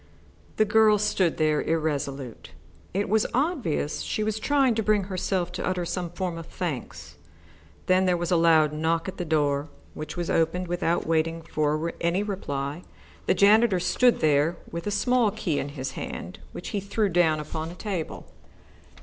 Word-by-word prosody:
The 215 - +4
girl 215 0 +5
stood 195 -4 +1
there, 155 -1 +2
irresolute. 140 -5 -2 0.4
It 200 +2 -1
was 215 +2 +2
obvious 255 - 0
that - - -4
she 215 - -1
was 215 0 -1
trying 270 0 +3
to 225 - 0
bring 210 -1 +2
herself 185 -1 -2
to - - -5
utter 180 -1 -1
some 175 0 -3
form 175 -1 -4
of 165 - -9
thanks. 165 -9 -5 0.7
Then 185 +1 +3
there 180 -1 +3
was 175 +1 -3
a - - +5
loud 160 -2 +4
knock 160 +2 0
at 190 - -6
the 175 - -3
door, 145 -2 +1 0.2
which 155 +1 -7
was 175 -1 -2
opened 165 +3 +1
without 175 -1 0
waiting 165 0 0
for 155 +2 -1
any 170 +4 +1
reply. 145 -7 -4 0.5
The - - +3
janitor 210 -1 +5
stood 245 +7 +3
there 155 +3 +3
with 170 +3 -5
a - - +2
small 225 +3 +2
key 195 -7 -2
in 140 - -3
his 135 -2 -5
hand, 90 - -7
which - - -7
he 205 - -1
threw 200 +2 0
down 165 -3 +3
upon 155 +1 -5
a 175 - -9
table. 185 -4 -4
175 Hz, 175 wpm, -26 LUFS, 155-200 Hz, 0.7 s, girl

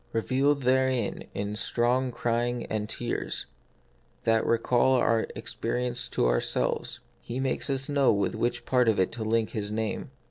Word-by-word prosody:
Revealed 135 +5 +1
therein 130 -3 +1
in 100 +1 -2
strong 125 +3 +1
crying 120 0 -1
and 105 -1 -2
tears, 120 +1 -3 0.8
that 115 -1 +3
recall 120 +3 +3
our 115 -2 +3
own - - -1
experience 125 0 -2
to - - +1
ourselves, - - 0 0.2
He 120 +2 -5
makes 135 +1 -1
us 135 -1 -1
know 140 -2 +3
with 100 -1 0
which 120 - -1
part 125 -2 +3
of 110 - +2
it 95 - +2
to 115 -1 -4
link 110 0 +1
His 105 -1 -3
name. 110 0 -2
120 Hz, 155 wpm, -28 LUFS, 110-130 Hz, 0.8 s, that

